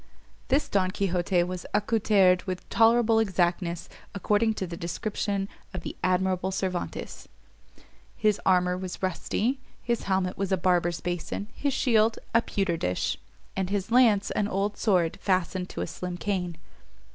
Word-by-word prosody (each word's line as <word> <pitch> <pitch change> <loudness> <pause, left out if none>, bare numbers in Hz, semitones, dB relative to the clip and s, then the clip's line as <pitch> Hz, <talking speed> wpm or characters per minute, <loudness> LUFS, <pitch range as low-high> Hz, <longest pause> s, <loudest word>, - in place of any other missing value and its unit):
This 275 +3 +2
Don 190 -2 +1
Quixote 180 -2 +1
was 180 0 -5
accoutered 205 -4 +3
with 185 -1 -4
tolerable 230 0 +4
exactness 175 -4 0 0.3
according 210 +3 +2
to 190 - -2
the 170 -1 -6
description 195 +3 -2 0.3
of 185 - -3
the - - -6
admirable 185 0 +1
Cervantes; 185 -2 -4 0.9
his 210 -1 +2
armour 180 -1 +3
was 185 0 -6
rusty, 220 +7 -1 0.2
his 235 -1 -1
helmet 190 -1 0
was 195 -1 -1
a 190 - +3
barber's 175 -1 +1
basin, 180 +3 -3
his 280 -2 -1
shield, 225 -2 +3 0.2
a 230 - +5
pewter 195 -6 -1
dish, 90 - -1 0.4
and 190 -1 -1
his 200 +1 -2
lance, 225 -5 +4
an 205 - 0
old 200 +1 -1
sword 180 -6 +1
fastened 185 -1 0
to - - -5
a - - 0
slim 180 -1 -5
cane. 180 -3 -2
190 Hz, 145 wpm, -27 LUFS, 180-210 Hz, 0.9 s, a